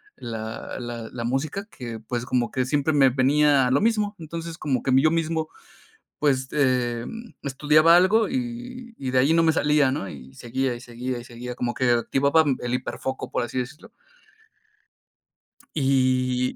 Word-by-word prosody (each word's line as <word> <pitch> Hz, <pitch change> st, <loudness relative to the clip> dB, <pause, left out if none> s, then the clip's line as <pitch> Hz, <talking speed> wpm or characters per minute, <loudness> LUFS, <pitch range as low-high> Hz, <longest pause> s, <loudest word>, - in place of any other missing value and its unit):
la 110 Hz, +1 st, -6 dB
la 120 Hz, -2 st, -6 dB
la 120 Hz, -2 st, -5 dB
música 145 Hz, -, -2 dB
que, 120 Hz, -, -8 dB
pues, 120 Hz, +2 st, -4 dB
como 120 Hz, -2 st, 0 dB
que 130 Hz, -1 st, 0 dB
siempre 145 Hz, +3 st, +1 dB
me 135 Hz, -2 st, +5 dB
venía 135 Hz, +1 st, +3 dB
lo 140 Hz, -, +3 dB
mismo. 210 Hz, -2 st, +1 dB
Entonces, 165 Hz, +1 st, -6 dB
como 135 Hz, -5 st, -1 dB
que, 130 Hz, -, 0 dB
mí 130 Hz, +1 st, +5 dB
yo 155 Hz, -, +4 dB
mismo, 160 Hz, -1 st, -1 dB, 0.7 s
pues, 130 Hz, -3 st, +1 dB
em, 130 Hz, -, -1 dB
estudiaba 150 Hz, +4 st, +4 dB
algo 210 Hz, +5 st, +4 dB
y 245 Hz, -1 st, -5 dB
y 130 Hz, -2 st, -3 dB
de 130 Hz, -, +2 dB
ahí 140 Hz, +5 st, +4 dB
no 165 Hz, 0 st, +4 dB
me 160 Hz, -1 st, +4 dB
salía, 150 Hz, -3 st, +3 dB
¿no?, 115 Hz, -8 st, -3 dB
y 65 Hz, -2 st, -12 dB
seguía, 130 Hz, +1 st, -2 dB
y 120 Hz, -, -9 dB
seguía, 125 Hz, +1 st, -5 dB
y 120 Hz, -, -9 dB
seguía, 120 Hz, +1 st, -7 dB
como 120 Hz, -1 st, -2 dB
que 130 Hz, -1 st, +1 dB
activaba, 140 Hz, +6 st, +3 dB
mm, 140 Hz, -3 st, 0 dB
el 120 Hz, 0 st, -2 dB
hiperfoco, 130 Hz, +1 st, -4 dB
por -, -, -1 dB
así 130 Hz, -, -4 dB
decirlo. 125 Hz, +5 st, -6 dB, 1.8 s
Y 130 Hz, -2 st, +1 dB
130 Hz, 170 wpm, -24 LUFS, 125-155 Hz, 1.8 s, me